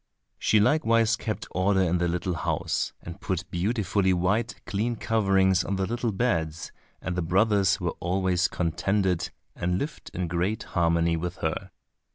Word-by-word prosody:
She 110 - +3
likewise 115 -2 +3
kept 110 -2 -4
order 95 +1 +2
in 90 0 +1
the 85 - +1
little 90 +1 -1
house, 75 -2 -1
and 85 +4 -9
put 95 -1 -3
beautifully 100 0 +1
white 105 +7 0
clean 115 +4 -1
coverings 95 -5 +2
on 100 - -2
the 95 0 0
little 120 +2 -1
beds, 85 -7 -1 0.3
and 90 - -2
the 90 - 0
brothers 100 +2 +3
were 85 -3 -1
always 90 0 +1
contented 90 +1 0 0.3
and 90 +1 0
lived 150 +9 -5
in 90 -1 -3
great 90 +5 -1
harmony 85 -1 +1
with 90 +2 -3
her. - - -2
95 Hz, 155 wpm, -26 LUFS, 85-105 Hz, 0.3 s, She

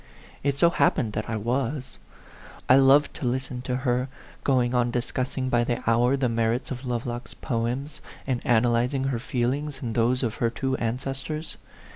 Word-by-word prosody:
It 140 0 0
so 170 +3 +5
happened 125 -8 +2
that 105 - -3
I 110 - -1
was. 125 +5 -2 0.7
I 130 - +7
loved 135 +2 +5
to 135 - -2
listen 125 0 -2
to 125 0 -2
her, 125 +1 +1 0.3
going 125 -3 +2
on 120 -1 +2
discussing 130 +2 -2
by 120 -2 +2
the 120 -1 -2
hour 120 +4 +3
the 135 -2 +1
merits 115 +2 0
of 130 0 -5
Lovelock's 120 0 -4
poems, 125 +4 -3 0.2
and 130 -3 -1
analyzing 120 +3 +2
her 135 -3 -1
feelings 130 +4 -2
and 115 -2 -2
those 120 +3 +2
of 115 -3 -2
her 115 - +1
two 130 +3 -2
ancestors. 135 +6 -4
125 Hz, 165 wpm, -26 LUFS, 120-135 Hz, 0.7 s, I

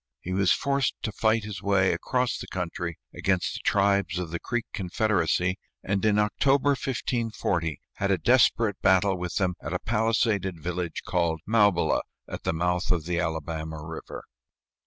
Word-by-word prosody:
He 90 - -5
was 95 -1 +3
forced 140 -2 +1
to 110 - -2
fight 110 +1 +1
his 105 -1 -6
way 100 -2 +3
across 125 -1 -1
the - - -7
country 85 -2 -4 0.2
against 95 -2 0
the - - -5
tribes 100 -2 +2
of 90 -3 -4
the 85 - -3
Creek 120 -1 -2
confederacy, 95 -2 0 0.2
and 100 -1 -1
in 105 -1 +3
October, 135 +7 +2
1540, 115 - -1 0.2
had 100 - 0
a 95 - +3
desperate 115 +1 +3
battle 95 +1 +4
with 90 -1 -4
them 95 -2 +1
at 85 - -5
a 90 - 0
palisaded 110 -5 0
village 90 0 -3
called 85 -2 0
Maubila, 100 -7 +3 0.3
at - - -7
the - - +2
mouth 90 +3 0
of 85 -4 +1
the 85 0 -1
Alabama 80 -1 -3
River. 80 0 -7
95 Hz, 160 wpm, -27 LUFS, 85-110 Hz, 0.3 s, battle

